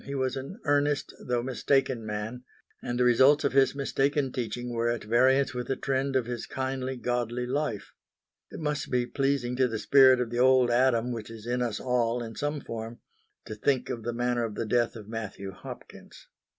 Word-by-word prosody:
He 140 - -6
was 130 -1 -1
an 135 - -7
earnest, 145 -1 +1
though 120 -1 -1
mistaken 130 -1 0
man, 110 +3 -5 0.4
and 120 - -3
the - - +4
results 130 +4 +5
of 140 - +1
his 135 0 +4
mistaken 140 0 0
teaching 120 0 -4
were 120 0 0
at 120 -1 -2
variance 130 +4 +3
with 125 -1 -4
the 135 - 0
trend 135 0 -1
of 130 -3 +2
his 120 -1 -5
kindly, 130 0 -3
godly 120 0 -2
life. 130 -4 -3 0.6
It - - -9
must 150 -2 -2
be 125 -1 +1
pleasing 135 -2 -1
to 130 -1 +3
the 115 -2 -3
spirit 130 +3 +6
of 120 -2 -2
the 120 - -2
Old 130 -1 +5
Adam 125 -1 +2
which 115 -2 -5
is 115 -1 -10
in 125 +1 -1
us 115 -4 -1
all 120 -1 0
in 115 -1 -8
some 145 0 -2
form, 115 0 -6 0.5
to - - -6
think 130 +5 0
of 115 - -4
the 120 +2 -3
manner 120 0 0
of 110 -2 -4
the - - -2
death 120 +2 +1
of 105 -3 -10
Matthew 105 -3 -6
Hopkins. - - -12
125 Hz, 200 wpm, -28 LUFS, 115-135 Hz, 0.6 s, spirit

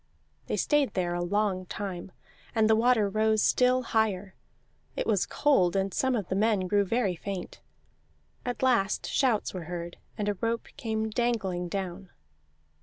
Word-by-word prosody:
They - - -1
stayed 295 -6 +2
there 175 -2 0
a 175 - -1
long 190 0 0
time, 190 -2 -5 0.4
and 220 -1 +4
the 220 - +5
water 225 -2 +3
rose 215 +1 +2
still 255 0 +3
higher; 205 -4 0 0.6
it - - -2
was 205 -5 +1
cold, 200 -12 +2
and 195 -1 0
some 260 -1 +1
of 205 -6 -2
the 190 - -2
men 210 0 +2
grew 200 +2 +2
very 200 -2 0
faint. 190 +2 -6 0.8
At 245 +1 -3
last 230 -6 +2
shouts 245 -6 +1
were 180 -3 -5
heard, 175 0 -6 0.2
and 210 -2 -2
a 205 - +2
rope 230 0 -1
came 220 -1 -2
dangling 205 -7 -1
down. 190 0 -4
205 Hz, 160 wpm, -28 LUFS, 185-230 Hz, 0.8 s, the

